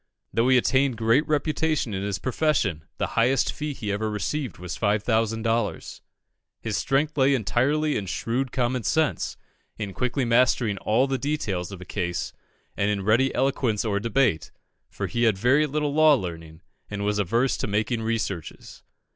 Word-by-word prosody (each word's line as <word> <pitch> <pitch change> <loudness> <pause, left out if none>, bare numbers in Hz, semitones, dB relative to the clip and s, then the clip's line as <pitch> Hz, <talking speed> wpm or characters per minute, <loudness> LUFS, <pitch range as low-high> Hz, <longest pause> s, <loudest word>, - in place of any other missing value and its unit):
Though 115 +5 +2
he 130 - +6
attained 125 +3 +2
great 115 +7 +2
reputation 155 -4 0
in 95 - -2
his 100 -1 -2
profession, 120 - 0
the - - -1
highest 125 +3 +2
fee 150 0 -4
he 105 -4 -4
ever 110 +2 -1
received 120 - -3
was 90 0 -6
5,000 110 +1 0
dollars. 115 -2 -2 0.6
His 110 -2 -3
strength 140 +6 0
lay 135 +1 +4
entirely 135 +8 +1
in 100 - -3
shrewd 125 +7 -2
common 125 0 0
sense, 155 +7 0 0.4
in 100 -3 -5
quickly 125 +3 -1
mastering 115 -3 +2
all 115 +5 +2
the 135 -1 -2
details 105 - -2
of 95 -2 -8
a - - -8
case, 90 -2 -3 0.4
and 100 +1 0
in 100 -2 -1
ready 115 +6 +3
eloquence 125 -5 0
or 100 -2 0
debate, 115 - +1 0.4
for - - -4
he 120 0 0
had 110 -4 +3
very 135 +8 +3
little 150 0 -1
law 155 -1 +6
learning, 80 - -7 0.3
and 100 -1 -4
was 105 0 0
averse 115 +7 +1
to - - -3
making 110 +3 -1
researches. 110 -7 -4
115 Hz, 165 wpm, -25 LUFS, 100-135 Hz, 0.6 s, he